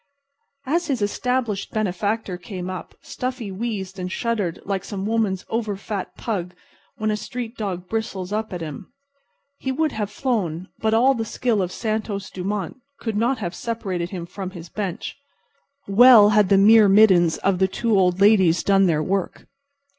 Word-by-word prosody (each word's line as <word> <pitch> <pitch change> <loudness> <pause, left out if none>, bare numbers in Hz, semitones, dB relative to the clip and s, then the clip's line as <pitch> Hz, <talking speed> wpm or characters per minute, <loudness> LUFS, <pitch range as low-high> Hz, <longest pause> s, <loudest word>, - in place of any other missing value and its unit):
As 335 +6 0
his 260 -8 -1
established 230 -1 -1
benefactor 205 0 -2
came 185 -1 -6
up 185 - -8
Stuffy 250 -5 -5
wheezed 195 -2 -4
and 185 0 -4
shuddered 210 -7 -2
like 195 -1 -2
some 195 -1 -5
woman's 215 -4 0
over 220 -3 -2
fat 195 0 -6
pug 180 -6 -3 0.4
when 215 0 0
a - - 0
street 235 +2 -6
dog 185 -5 -4
bristles 200 -3 -3
up 215 +1 -2
at 180 -2 -5
him. 160 +6 -7 0.7
He 265 - -2
would 310 +3 0
have 210 -4 -3
flown, 195 - -2
but 220 0 +1
all 255 +4 +5
the 230 -3 -2
skill 225 -1 0
of 180 -1 -2
Santos 215 -2 -3
Dumont 190 +2 -4 0.2
could 225 -3 -3
not 235 +5 +1
have 180 -5 -4
separated 195 -7 -3
him 180 -3 -6
from 190 +1 -6
his 175 -3 -10
bench. 195 -3 -5 0.7
Well 215 +1 +8
had 210 -2 +4
the 200 - +5
myrmidons 200 -4 +6
of 190 -1 0
the 190 - +4
two 225 +3 0
old 180 -1 +3
ladies 195 -5 +4
done 195 -1 +4
their 155 -3 +1
work. 195 +1 -2
205 Hz, 165 wpm, -22 LUFS, 185-225 Hz, 0.7 s, Well